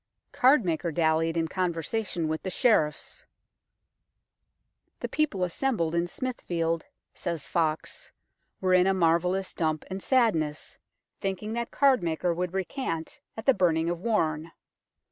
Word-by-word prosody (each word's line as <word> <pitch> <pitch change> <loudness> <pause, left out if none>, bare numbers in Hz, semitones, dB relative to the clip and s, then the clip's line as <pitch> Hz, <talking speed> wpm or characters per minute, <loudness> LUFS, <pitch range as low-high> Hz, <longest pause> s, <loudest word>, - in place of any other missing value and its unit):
Cardmaker 185 - +3
dallied 165 +1 +1
in 165 0 +1
conversation 175 +1 -2
with 160 0 -2
the 190 - -4
Sheriffs. 175 -7 +1 0.8
" - - -52
The - - -2
people 280 -12 0
assembled 180 -2 0
in 170 +1 +1
Smithfield," 170 - -2 0.3
says 165 -4 -3
Foxe, 165 - -2 0.5
"were 185 -1 +2
in 185 0 +5
a 195 - +3
marvellous 180 +2 +1
dump 155 -2 -1
and 190 +1 -4
sadness, 175 - +1 0.4
thinking 195 +3 -3
that 235 0 -2
Cardmaker 175 - +2
would 180 +1 -3
recant 180 - -3 0.2
at 220 - -6
the 270 - +6
burning 170 -4 +2
of 175 - -3
Warne. 165 -7 0
175 Hz, 125 wpm, -28 LUFS, 165-210 Hz, 0.8 s, the